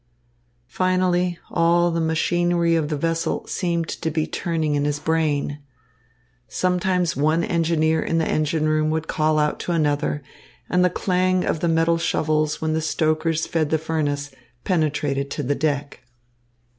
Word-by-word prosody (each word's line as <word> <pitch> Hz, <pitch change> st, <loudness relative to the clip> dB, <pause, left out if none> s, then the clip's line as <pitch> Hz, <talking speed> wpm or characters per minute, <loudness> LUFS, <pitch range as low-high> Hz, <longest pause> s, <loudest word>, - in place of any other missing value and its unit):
Finally, 180 Hz, +3 st, +1 dB
all 170 Hz, +1 st, +3 dB
the 165 Hz, 0 st, -1 dB
machinery 170 Hz, +1 st, +1 dB
of 155 Hz, -2 st, 0 dB
the 150 Hz, -, -1 dB
vessel 165 Hz, +2 st, -1 dB
seemed 170 Hz, -3 st, -1 dB
to 165 Hz, -, -3 dB
be 155 Hz, 0 st, -1 dB
turning 160 Hz, -3 st, -2 dB
in 145 Hz, 0 st, +1 dB
his 145 Hz, 0 st, 0 dB
brain. 150 Hz, -2 st, 0 dB, 0.9 s
Sometimes 180 Hz, +1 st, 0 dB
one 155 Hz, +4 st, +2 dB
engineer 160 Hz, -2 st, +1 dB
in 165 Hz, -, -1 dB
the 165 Hz, -, +1 dB
engine 155 Hz, 0 st, 0 dB
room 155 Hz, 0 st, +1 dB
would 160 Hz, 0 st, -2 dB
call 155 Hz, 0 st, +1 dB
out 150 Hz, 0 st, +1 dB
to -, -, -3 dB
another, 145 Hz, -2 st, 0 dB, 0.5 s
and 180 Hz, 0 st, +3 dB
the 180 Hz, -, +4 dB
clang 185 Hz, 0 st, +1 dB
of -, -, -1 dB
the 170 Hz, -, 0 dB
metal 165 Hz, 0 st, +2 dB
shovels 155 Hz, -2 st, 0 dB
when 160 Hz, 0 st, -1 dB
the 160 Hz, -, 0 dB
stokers 160 Hz, +1 st, 0 dB
fed 160 Hz, -3 st, -1 dB
the 160 Hz, -, +2 dB
furnace 145 Hz, -2 st, -2 dB, 0.3 s
penetrated 145 Hz, -5 st, 0 dB
to 145 Hz, -, -4 dB
the 140 Hz, +2 st, 0 dB
deck. 145 Hz, -1 st, -2 dB
160 Hz, 155 wpm, -22 LUFS, 150-170 Hz, 0.9 s, the